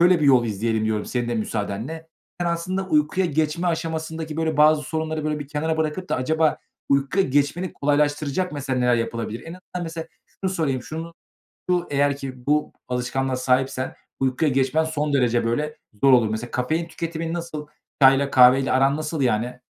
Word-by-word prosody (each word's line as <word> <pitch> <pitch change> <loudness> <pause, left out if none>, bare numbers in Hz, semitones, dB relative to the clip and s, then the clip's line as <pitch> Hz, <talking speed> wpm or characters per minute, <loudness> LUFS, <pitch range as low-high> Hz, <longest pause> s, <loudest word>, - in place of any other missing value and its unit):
şöyle 175 -1 +5
bir - - +2
yol 130 -3 +6
izleyelim 110 0 -1
diyorum 110 -1 0
senin 120 -1 -2
de 120 - -1
müsaadenle. 110 +9 -3 0.3
Sen 175 - 0
aslında 180 +3 -2
uykuya 155 +4 +2
geçme 160 +2 0
aşamasındaki, 160 -1 -3
böyle, 160 -2 0
bazı 150 0 +5
sorunları 155 +1 -3
böyle 155 0 -1
bir 145 -2 -7
kenara 160 +2 -1
bırakıp 160 +4 -2
da - - 0
acaba 155 +4 +1 0.3
uykuya 140 +8 +2
geçmeni 145 +6 0
kolaylaştıracak 145 +4 0
mesela 135 -3 -2
neler 125 -1 +3
yapılabilir? 115 -1 -3
En 165 - -9
azından 180 0 -7
mesela 165 -1 -5 0.4
şunu 190 - +1
sorayım. 145 -8 -1
Şunu 165 +4 -6 0.6
şu 175 -1 +1
eğer 140 0 +2
ki 130 -3 -8
bu 150 +1 +1 0.2
alışkanlığa 130 +1 -1
sahipsen 130 0 0 0.3
uykuya 135 +4 +1
geçmen 135 +4 +2
son 150 -2 -2
derece 120 -4 +2
böyle 150 +7 -1 0.3
zor 135 - +7
olur. 120 -3 +5
Mesela 110 +3 -4
kafein 155 +7 -1
tüketiminin 165 0 -4
nasıl? 165 -3 -5 0.4
Çayla 135 +1 +6
kahveyle 130 +1 +6
aran 135 +2 +3
nasıl 155 0 -3
yani? 125 +1 0
150 Hz, 170 wpm, -23 LUFS, 130-160 Hz, 0.6 s, zor